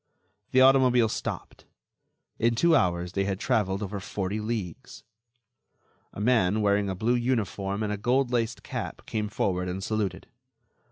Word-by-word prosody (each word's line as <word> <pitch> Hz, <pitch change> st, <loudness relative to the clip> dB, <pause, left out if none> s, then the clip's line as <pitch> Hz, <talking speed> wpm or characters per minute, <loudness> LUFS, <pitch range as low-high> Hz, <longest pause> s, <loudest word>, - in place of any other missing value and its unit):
The 130 Hz, -, +4 dB
automobile 130 Hz, -3 st, +5 dB
stopped. -, -, -6 dB, 0.7 s
In 115 Hz, +1 st, +2 dB
two 170 Hz, +7 st, +4 dB
hours 90 Hz, -, +1 dB
they 100 Hz, +1 st, 0 dB
had 95 Hz, -1 st, -2 dB
traveled 105 Hz, -5 st, 0 dB
over 100 Hz, 0 st, -4 dB
forty 100 Hz, +2 st, -3 dB
leagues. 105 Hz, -6 st, -5 dB, 1.1 s
A -, -, -9 dB
man, 110 Hz, -3 st, +2 dB
wearing 100 Hz, -1 st, +2 dB
a 95 Hz, -, -2 dB
blue 110 Hz, +6 st, +1 dB
uniform 110 Hz, -5 st, -1 dB
and 105 Hz, -1 st, -1 dB
a -, -, -3 dB
goldlaced 120 Hz, -2 st, 0 dB
cap, -, -, -6 dB
came 105 Hz, -1 st, -3 dB
forward 90 Hz, -3 st, -1 dB
and 95 Hz, +2 st, -4 dB
saluted. 100 Hz, -4 st, -2 dB
105 Hz, 145 wpm, -27 LUFS, 95-120 Hz, 1.1 s, automobile